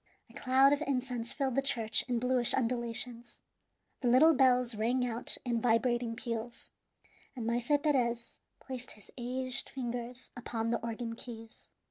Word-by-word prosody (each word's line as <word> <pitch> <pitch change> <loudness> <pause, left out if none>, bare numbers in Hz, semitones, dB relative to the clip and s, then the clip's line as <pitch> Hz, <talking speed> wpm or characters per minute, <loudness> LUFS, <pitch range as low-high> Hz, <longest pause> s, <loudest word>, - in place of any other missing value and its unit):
A - - -19
cloud 265 +2 +4
of 290 - 0
incense 250 -3 -2
filled 270 -3 -1
the 275 - +2
church 230 -5 +1
in 245 -2 0
bluish 250 0 +2
undulations. 240 -1 -2 0.6
The 250 - -1
little 275 +7 +7
bells 250 -3 +3
rang 240 +4 +1
out 235 -1 -2
in 235 -2 0
vibrating 240 0 +1
peals, 235 0 -5 0.6
and 240 -3 -4
Maese 235 +1 -1 0.2
Perez 240 -6 0 0.2
placed 255 -2 -7
his 210 - -16
aged 255 +1 -3
fingers 245 -1 -5
upon 230 -2 -3
the 235 - -1
organ 230 0 -4
keys. 225 -1 -10
245 Hz, 145 wpm, -32 LUFS, 235-255 Hz, 0.6 s, little